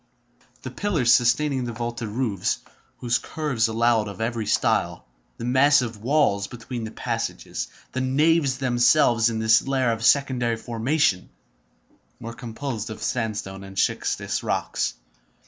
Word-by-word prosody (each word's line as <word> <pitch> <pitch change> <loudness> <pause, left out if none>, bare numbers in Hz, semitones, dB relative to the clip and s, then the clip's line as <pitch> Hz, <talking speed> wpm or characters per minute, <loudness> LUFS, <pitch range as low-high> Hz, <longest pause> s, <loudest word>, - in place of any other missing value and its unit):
The 130 - -6
pillars 155 - +1
sustaining 130 +2 +2
the 120 - -4
vaulted 120 0 -4
roofs, 105 -4 -1 0.4
whose 120 -1 0
curves 135 -8 -1
allowed 115 -1 +2
of 100 -3 -8
every 115 -1 -2
style, - - +1 0.3
the 115 - -5
massive 125 -3 +3
walls 115 -6 +2
between 120 0 -6
the - - -5
passages, - - -4 0.2
the 130 - -2
naves 140 +1 +2
themselves 120 -2 +3
in 115 - -3
this 110 +1 +4
layer 130 -3 0
of 115 0 -3
secondary 125 -3 +2
formation, 115 -3 0 0.9
were 115 +1 -7
composed 115 -1 -5
of 110 - -7
sandstone 105 -5 -3
and 95 0 -11
schistous - - -1
rocks. - - -2
120 Hz, 130 wpm, -24 LUFS, 110-130 Hz, 0.9 s, this